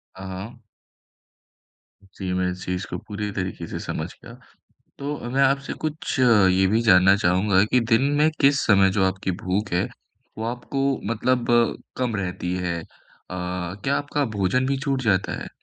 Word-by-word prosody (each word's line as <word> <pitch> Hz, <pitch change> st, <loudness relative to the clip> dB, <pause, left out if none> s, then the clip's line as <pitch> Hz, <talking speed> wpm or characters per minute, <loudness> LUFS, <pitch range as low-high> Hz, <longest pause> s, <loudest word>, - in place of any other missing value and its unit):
हाँ, 95 Hz, -, -9 dB
हाँ। 105 Hz, +6 st, -8 dB, 1.6 s
जी 95 Hz, -2 st, -3 dB
मैं 90 Hz, 0 st, 0 dB
इस 90 Hz, +1 st, -8 dB
चीज़ 90 Hz, +1 st, -2 dB
को -, -, -3 dB
पूरी 105 Hz, 0 st, -5 dB
तरीके 95 Hz, -1 st, -4 dB
से -, -, -5 dB
समझ -, -, -4 dB, 0.2 s
गया। -, -, -11 dB, 0.7 s
तो 145 Hz, +1 st, -3 dB
मैं 135 Hz, +2 st, +2 dB
आपसे 135 Hz, +1 st, +1 dB
कुछ 155 Hz, -2 st, -3 dB
अ, 115 Hz, -6 st, +5 dB
ये 95 Hz, +1 st, +3 dB
भी 110 Hz, +4 st, +2 dB
जानना 95 Hz, -3 st, +6 dB
चाहूँगा 95 Hz, 0 st, +3 dB
कि 125 Hz, +3 st, +2 dB
दिन 115 Hz, +4 st, +5 dB, 0.2 s
में 155 Hz, +1 st, +4 dB
किस 140 Hz, -1 st, +4 dB
समय 95 Hz, -3 st, +5 dB
जो 95 Hz, -, +4 dB
आपकी 95 Hz, 0 st, -3 dB
भूख 100 Hz, +3 st, -1 dB
है 90 Hz, -, +1 dB, 0.5 s
वो 110 Hz, -, -3 dB
आपको 135 Hz, +2 st, -3 dB, 0.3 s
मतलब 125 Hz, +2 st, 0 dB, 0.5 s
कम 125 Hz, -4 st, -1 dB
रहती 90 Hz, -2 st, -3 dB
है? 85 Hz, -1 st, -2 dB
अ, -, -, -15 dB, 0.5 s
क्या 90 Hz, +7 st, -2 dB
आपका 145 Hz, 0 st, -1 dB
भोजन 125 Hz, +7 st, +1 dB
भी 135 Hz, 0 st, 0 dB
छूट 135 Hz, -2 st, 0 dB
जाता 95 Hz, -4 st, +1 dB
है? -, -, -8 dB
105 Hz, 170 wpm, -24 LUFS, 95-130 Hz, 1.6 s, जानना